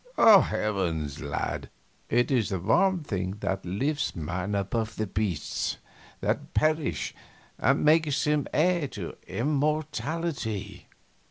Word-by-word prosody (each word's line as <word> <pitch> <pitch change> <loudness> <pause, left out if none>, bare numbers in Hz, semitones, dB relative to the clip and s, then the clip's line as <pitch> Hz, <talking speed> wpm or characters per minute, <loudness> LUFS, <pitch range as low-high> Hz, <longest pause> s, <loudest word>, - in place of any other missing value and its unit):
Heavens! 95 - +4
lad, 70 -2 -3 0.4
it 120 +4 +2
is 120 -6 +2
the 95 -3 -1
one 175 - +3
thing 95 -6 -3
that 95 -1 -1
lifts 140 +11 -1
man 90 +5 -3
above 110 +3 -1
the 110 - -1
beasts 95 -5 -2 0.4
that - - -2
perish 155 -1 +1 0.5
and - - +2
makes 155 -2 +4
him 150 -2 +1
heir 170 -1 +2
to 100 -9 -7
immortality!" 145 - -2
115 Hz, 110 wpm, -27 LUFS, 95-150 Hz, 0.5 s, Heavens